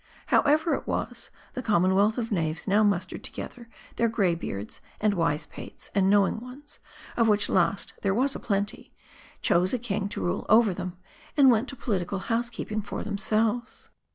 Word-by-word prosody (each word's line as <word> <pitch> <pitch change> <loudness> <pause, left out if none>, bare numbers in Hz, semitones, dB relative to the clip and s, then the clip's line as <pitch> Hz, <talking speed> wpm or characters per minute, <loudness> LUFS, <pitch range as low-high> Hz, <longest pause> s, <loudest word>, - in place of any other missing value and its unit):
However 310 +3 +4
it - - -3
was, - - -3 0.2
the 255 - -4
commonwealth 200 0 +3
of 230 -1 -2
knaves 160 -5 -1
now 205 +2 +4
mus 200 -4 +2
tered - - -8
together 235 -2 -8 0.3
th.eir 230 - +3
gray 200 -6 +2
beards, 105 - -6 0.2
and 210 -1 +2
wise 165 -4 0
pates, - - -11
and 195 -1 +3
know 200 -1 +5
ing - - -3
ones, 265 +5 -12 0.4
of 230 -1 +3
which 205 -1 +4
last 185 +2 +1
there 195 -1 +1
was 270 +4 +2
a - - -4
plenty, 200 -2 -2 0.5
chose 180 +5 +3
a - - 0
king 210 -4 -2
to - - -3
rule 180 +2 -2
' - - -28
over 220 -2 +6
them, 180 0 -6 0.4
and 270 -3 +7
went 235 +3 +1
to 275 - -5
political 195 -6 -2
housekeeping 230 0 -2
for 205 - -5
themselves. 215 +3 -1
205 Hz, 180 wpm, -27 LUFS, 190-235 Hz, 0.5 s, and